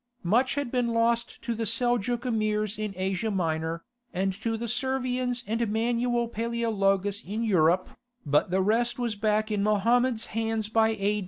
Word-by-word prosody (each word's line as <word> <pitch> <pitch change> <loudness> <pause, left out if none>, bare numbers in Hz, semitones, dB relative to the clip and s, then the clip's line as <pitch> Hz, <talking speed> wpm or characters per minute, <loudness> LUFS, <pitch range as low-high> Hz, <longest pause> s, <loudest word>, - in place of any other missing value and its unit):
Much 240 +10 +2
had 285 -4 -2
been 245 -2 +1
lost 230 0 0
to 235 - -1
the 225 0 -2
Seljouk 240 +1 +1
Emirs 215 -3 -1
in 215 -1 -2
Asia 190 +3 -1
Minor, 165 -3 -1 0.3
and 190 +1 -1
to 225 +3 -3
the 235 +1 -4
Servians 250 0 -1
and 225 0 -1
Manuel 235 +1 +1
Paleologus 210 -4 0
in 215 +4 -3
Europe, 185 -3 +3 0.4
but 145 +4 +2
the 190 +2 +1
rest 230 +6 +1
was 240 -3 -1
back 215 +1 0
in 210 -1 0
Mohammed's 230 +3 +2
hands 225 -1 -1
by 220 0 +3
A. 205 +1 +1
225 Hz, 160 wpm, -27 LUFS, 200-235 Hz, 0.4 s, Europe